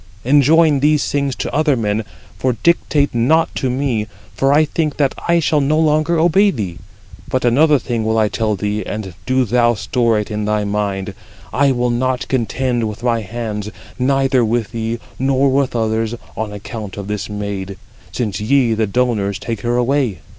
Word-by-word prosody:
Enjoin 145 +3 +4
these 150 +1 +2
things 140 -2 0
to - - -4
other 150 -1 +2
men; 105 -1 -1 0.4
for 130 -1 +1
dictate 150 -4 +2
not 155 +8 +2
to 130 - -1
me, 125 -4 -1 0.3
for 135 0 +1
I 155 +2 +5
think 155 -1 -2
that 140 -2 +2
I 170 0 +4
shall 155 -2 +2
no 145 +3 +1
longer 155 +1 +2
obey 175 +5 +4
thee. 95 - -4 0.5
But 130 -1 0
another 145 +5 +4
thing 120 -3 -3
will 110 +1 0
I 110 -1 +3
tell 110 +1 -1
thee, 105 +1 -2
and 100 -2 -5
do 130 0 +2
thou 120 +1 +2
store 115 +2 +1
it 105 +1 -3
in 105 0 -2
thy 105 0 0
mind: 100 -1 -2 0.4
I 140 +3 +3
will 125 -1 0
not 130 +1 -1
contend 125 -1 0
with 105 +2 -9
my 115 -2 +1
hands, 105 -1 -5 0.3
neither 135 -1 +2
with 115 -2 -1
thee, 115 0 -3 0.2
nor 135 +1 +2
with 135 -1 0
others, 110 0 0 0.2
on 110 -1 -3
account 105 0 -7
of 100 - -5
this 105 -1 -4
maid, 100 -2 -5 0.3
since 105 -5 -3
ye, 120 +1 +2
the 110 0 0
donors, 105 -4 0
take 115 -3 -5
her 120 +2 0
away. 125 - 0
120 Hz, 180 wpm, -18 LUFS, 105-140 Hz, 0.5 s, I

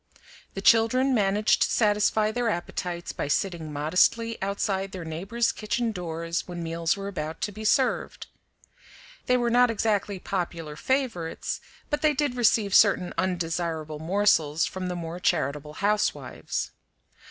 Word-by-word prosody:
The 195 - -5
children 255 +5 +4
managed 205 -1 +2
to - - +3
satisfy 210 0 +2
their 240 +1 0
appetites 175 -2 -3
by - - -4
sitting 165 0 -1
modestly 180 +10 +1
outside 195 0 -1
their 180 -3 -6
neighbors' 195 +9 -1
kitchen 225 +2 -2
doors 170 -2 -4
when 175 -1 -5
meals 165 +2 -1
were 195 0 -5
about 160 -5 -5
to 210 - -1
be 215 +2 -8
served. 255 +4 +1 1.0
They 250 - +4
were 240 -1 0
not 245 +1 +5
exactly 210 -2 0
popular 170 -5 -4
favorites, 230 - -2 0.3
but 295 0 0
they 305 -1 +3
did 285 -2 0
receive 220 -4 +2
certain 195 -4 +4
undesirable 165 -4 -2
morsels 165 -3 +2
from 185 -1 -4
the 180 - -3
more 170 0 -5
charitable 150 -4 -1
housewives. 210 +4 -1
195 Hz, 140 wpm, -26 LUFS, 165-220 Hz, 1.0 s, not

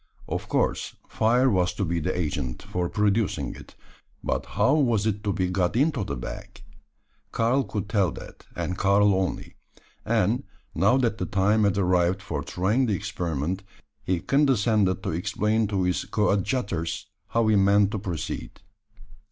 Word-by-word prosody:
Of - - -4
course, - - 0
fire 120 +4 +2
was 90 -7 +1
to 100 - -1
be 85 0 -1
the 90 +3 -2
agent 75 -7 -3
for 90 -1 -2
producing 105 -1 0
it: - - -14 0.5
but - - -2
how 135 - +4
was 120 -9 +2
it 105 -1 -1
to 100 - +1
be 95 -1 0
got 90 +1 0
into 140 -2 +2
the 100 - -4
bag? - - -8 0.7
Karl 120 +4 +2
could 105 -5 -4
tell 100 -6 +1
that, - - -12
and 90 - -3
Karl 100 +1 +4
only; 95 -1 -2 0.5
and, - - +1 0.3
now 100 +9 +3
that 120 -5 0
the - - -2
time 105 +2 +2
had 100 -1 +1
arrived 90 -1 +2
for - - -3
trying 105 +9 0
the 105 - +1
experiment, 90 -3 -3 0.4
he 90 -2 0
condescended 110 - +2
to 100 - -2
explain 105 +6 0
to 100 -2 0
his 90 0 0
coadjutors 100 -4 -1 0.2
how 115 0 +1
he 110 - +4
meant 100 0 +4
to 110 - -2
proceed. 90 -5 -5
100 Hz, 160 wpm, -25 LUFS, 90-110 Hz, 0.7 s, how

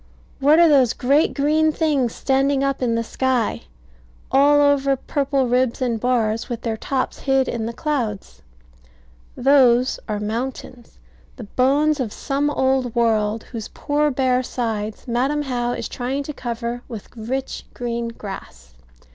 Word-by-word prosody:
What 290 +3 +5
are 340 0 +7
those 270 -6 +4
great 285 +6 +2
green 310 +2 +2
things 290 -7 0
standing 270 0 +1
up 275 -1 -1
in 235 -2 +1
the 230 - 0
sky, 255 -1 -1 0.7
all 285 +2 +5
over 280 -1 +3
purple 275 0 -1
ribs 250 0 +1
and 240 -4 -1
bars, 230 -2 0
with 235 -2 -4
their 225 -2 -1
tops 260 +4 -3
hid 270 -1 +1
in 225 -2 -3
the - - -3
clouds? 230 - -3 1.0
Those 255 -2 +4
are 210 -1 -1
mountains; 240 +2 -5 0.4
the 245 - -9
bones 280 +7 +2
of 240 -5 -2
some 280 +4 -1
old 265 -4 0
world, 220 -2 +1
whose 225 -3 -7
poor 295 0 0
bare 255 -2 +1
sides 220 -3 -4
Madam 265 +5 0
How 245 -3 -1
is - - -4
trying 260 +3 -3
to 300 - -6
cover 235 -1 -4
with 225 -5 -8
rich 255 +4 -4
green 235 -1 -3
grass. 65 - -9
255 Hz, 145 wpm, -21 LUFS, 230-275 Hz, 1.0 s, are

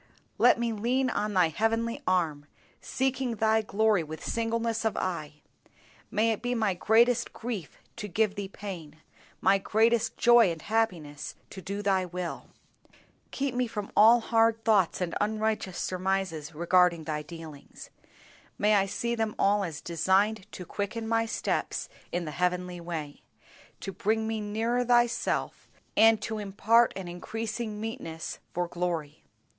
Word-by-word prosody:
Let - - +6
me 235 -1 0
lean 250 +4 0
on 210 -1 -2
Thy 180 -3 +4
heavenly 225 +5 -1
arm, 160 -6 0 0.3
seeking 265 -2 -1
Thy 220 +1 +3
glory 215 -2 +2
with 160 0 -8
singleness 230 0 -1
of 220 - 0
eye. 155 -5 -4 0.7
May 220 +2 +2
it 220 - -3
be 245 +1 -1
my 215 -4 +1
greatest 230 +6 +3
grief 220 -9 -5 0.2
to 210 -3 -5
give 210 +2 +1
Thee 200 -1 -5
pain, 180 -7 -8 0.4
my 195 0 +4
greatest 225 +3 +2
joy 240 -4 +6
and 165 - -6
happiness 180 -10 -2 0.2
to 190 - -8
do 200 +3 -4
Thy 190 -2 +2
will. 180 0 -5 0.8
Keep 275 -2 -2
me 250 0 0
from 210 -3 -5
all 230 +3 +7
hard 225 -1 +2
thoughts 200 -6 +3
and 175 -2 -2
unrighteous 215 -3 -1
surmises 185 -4 -2
regarding 170 0 +3
Thy 155 -1 -3
dealings. 155 -2 -11 0.7
May 210 +1 +3
I 195 -1 +3
see 235 +4 -2
them 220 -2 -1
all 205 +1 +3
as 165 -5 -5
designed 190 +5 +1
to 180 - -7
quicken 210 +5 -4
my 225 0 +1
steps - - -2 0.2
in 175 0 -2
the 155 - -5
heavenly 180 +2 -1
way, 160 -4 -6 0.6
to 195 - -4
bring 220 +4 0
me 220 -1 -2
nearer 225 +4 0
Thyself, 240 -1 +1 0.3
and 225 0 +6
to 220 -1 -3
impart 215 +4 +3
an 190 -2 -6
increasing 215 +4 -4
meetness 165 -7 -5
for 175 0 -1
glory. 170 -4 -3
205 Hz, 150 wpm, -28 LUFS, 180-225 Hz, 0.8 s, all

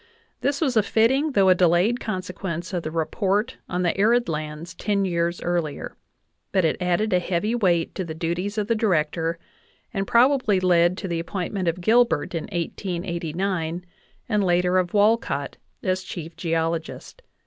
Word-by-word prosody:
This 280 +2 -1
was 270 -6 +1
a 220 - +6
fitting 265 +8 +2
though 195 -4 +4
a - - +8
delayed 180 +6 +3
consequence 185 -3 -4
of 175 - -1
the 155 - -4
report 195 +8 -1
on 180 0 -1
the 175 - +1
arid 235 +4 +3
lands 155 +1 -5
ten 200 +2 0
years 170 -1 -1
earlier; 170 -4 -2 0.6
but 190 -3 +2
it 160 - 0
added 180 +4 +1
a 180 - +4
heavy 180 +5 -1
weight 180 -8 +1
to 190 - -3
the 160 -2 -6
duties 175 +5 -2
of 210 - +1
the 230 - +1
Director, 165 -6 0 0.6
and 195 -2 -2
probably 245 -5 +4
led 175 -1 +3
to 195 - -4
the 170 -2 -2
appoint 180 +3 -4
ment 190 -3 -2
of 170 +2 -1
Gilbert 220 -7 +3
in 165 - -3
1889, 175 -1 -3 0.4
and 210 -3 +1
later 180 0 +3
of 180 +1 -2
Walcott, 205 -10 +1 0.3
as 185 0 0
chief 170 -3 -7
geolo 165 -1 0
gist. 330 - -11
180 Hz, 170 wpm, -24 LUFS, 170-205 Hz, 0.6 s, a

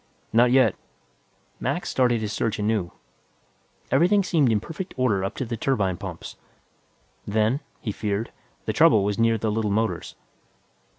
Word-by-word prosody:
"Not 120 +2 +5
yet." 125 -4 +4 0.8
Mac - - -2
started 120 -3 +1
his 105 -1 -3
search 110 -2 -1
anew. 105 -4 -1 1.0
Everything 195 +4 +4
seemed 155 -9 +2
in 110 - +2
perfect 165 - -7
order 110 -7 +1
up 95 - -3
to 130 - -3
the 115 0 -4
turbine 105 -7 0
pumps. 95 -4 -8 0.9
Then, 110 +5 +1 0.2
he 110 - -3
feared, 105 +2 -3 0.3
the - - -1
trouble 105 - +5
was 105 +2 -1
near 115 0 +3
the 110 0 -1
little 110 0 -1
motors. 110 +2 -1
110 Hz, 145 wpm, -24 LUFS, 105-125 Hz, 1.0 s, Not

